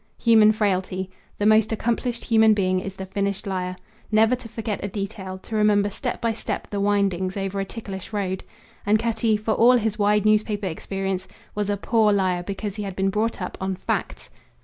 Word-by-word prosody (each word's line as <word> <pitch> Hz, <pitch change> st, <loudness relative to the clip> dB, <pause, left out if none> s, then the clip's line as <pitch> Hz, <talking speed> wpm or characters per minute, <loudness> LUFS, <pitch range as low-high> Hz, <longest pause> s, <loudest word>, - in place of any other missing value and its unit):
Human 220 Hz, -2 st, +6 dB
frailty. 190 Hz, -3 st, -1 dB, 0.3 s
The 205 Hz, -, -1 dB
most 215 Hz, 0 st, +5 dB
accomplished 235 Hz, +2 st, -1 dB
human 220 Hz, -2 st, +5 dB
being 185 Hz, -2 st, +1 dB
is 195 Hz, +1 st, -6 dB
the 190 Hz, -, -6 dB
finished 200 Hz, +1 st, -2 dB
liar. 185 Hz, -2 st, -3 dB, 0.4 s
Never 220 Hz, +3 st, +4 dB
to 245 Hz, -2 st, -11 dB
forget 215 Hz, -3 st, -4 dB
a -, -, -1 dB
detail, 195 Hz, -1 st, -5 dB
to 220 Hz, +4 st, -7 dB
remember 205 Hz, -1 st, +3 dB
step -, -, -3 dB
by 230 Hz, 0 st, 0 dB
step 220 Hz, -, -4 dB
the 205 Hz, -, -2 dB
windings, 195 Hz, -2 st, +1 dB
over 195 Hz, 0 st, -2 dB
a 195 Hz, -, -1 dB
ticklish 195 Hz, -3 st, -7 dB
road. 190 Hz, -3 st, -2 dB, 0.4 s
And 210 Hz, +2 st, +3 dB
Cutty, 225 Hz, -1 st, +1 dB
for 215 Hz, +1 st, -2 dB
all 240 Hz, +3 st, +6 dB
his 220 Hz, -2 st, -1 dB
wide 210 Hz, 0 st, +3 dB
newspaper 215 Hz, -1 st, +2 dB
experience, 190 Hz, +2 st, -3 dB, 0.3 s
was 205 Hz, -1 st, -2 dB
a 205 Hz, -, 0 dB
poor 220 Hz, +1 st, +3 dB
liar 185 Hz, -3 st, +1 dB
because 200 Hz, +2 st, -5 dB
he -, -, -3 dB
had 195 Hz, -2 st, -5 dB
been 195 Hz, 0 st, +1 dB
brought 215 Hz, -1 st, -1 dB
up 180 Hz, -, -5 dB
on 190 Hz, 0 st, -1 dB
facts. 185 Hz, -, -4 dB
205 Hz, 195 wpm, -24 LUFS, 190-215 Hz, 0.4 s, Human